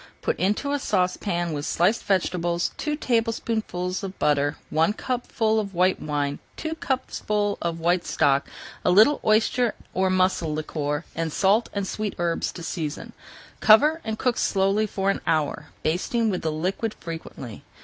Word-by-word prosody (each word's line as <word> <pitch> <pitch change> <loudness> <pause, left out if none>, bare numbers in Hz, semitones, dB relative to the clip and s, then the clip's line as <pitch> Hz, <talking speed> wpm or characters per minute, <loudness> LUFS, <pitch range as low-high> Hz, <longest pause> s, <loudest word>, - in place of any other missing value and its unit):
Put - - -1
into 210 - 0
a 290 - 0
saucepan 180 - 0
with 145 -1 -3
sliced 180 +9 +1
vegetables, 175 -3 0
two 300 -1 -2
tablespoonfuls 225 - -1
of 195 -1 -6
butter, 145 0 +1
one 160 +6 +3
cupful 225 -2 0
of 200 -3 -4
white 185 +2 +2
wine, 145 -1 -2 0.2
two 320 0 -3
cupfuls 215 -8 -1
of 170 -1 -2
white 175 +2 +2
stock, 140 0 +2 0.4
a - - +2
little 215 +11 +6
oyster 225 +2 +2 0.2
or 190 0 +2
mussel 185 -3 +2
liquor, 150 0 -2
and 165 -1 -2
salt 205 +7 +2
and 200 -1 -2
sweet 210 0 -3
herbs 170 -1 -1
to 170 - -8
season. 160 -2 -4 0.5
Cover 300 +9 +6
and 220 0 -3
cook 250 0 0
slowly 195 +2 +2
for 195 -1 0
an - - -4
hour, 150 -1 0 0.2
basting 215 +7 +1
with 180 - -2
the 160 - -1
liquid 190 +8 -2
frequently. 160 -9 -8
185 Hz, 155 wpm, -25 LUFS, 165-220 Hz, 0.5 s, little